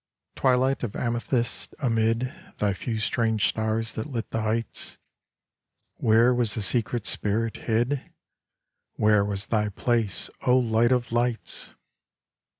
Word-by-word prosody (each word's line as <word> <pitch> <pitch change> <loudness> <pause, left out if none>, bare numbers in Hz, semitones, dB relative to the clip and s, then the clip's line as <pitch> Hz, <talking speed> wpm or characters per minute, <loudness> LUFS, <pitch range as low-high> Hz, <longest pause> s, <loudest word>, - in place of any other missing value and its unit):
Twilight 130 +1 +2
of 115 -5 -4
amethyst, 120 0 -2
amid 115 -1 0 0.2
Thy 105 -1 +1
few 115 +4 -4
strange 110 -1 +1
stars 110 +1 -1
that 110 - -4
lit 120 -5 -4
the 115 - -1
heights, 110 0 -3 1.0
Where 115 +3 +4
was 120 -4 +3
the 110 - -2
secret 115 +1 0
spirit 110 +2 0
hid? 120 +4 -1 0.8
Where 105 -1 +3
was 100 -1 -1
Thy 105 0 0
place, 110 0 -1
O 125 0 +4
Light 120 -1 +2
of 120 -2 +1
Lights 120 0 -2
115 Hz, 125 wpm, -26 LUFS, 110-120 Hz, 1.0 s, Where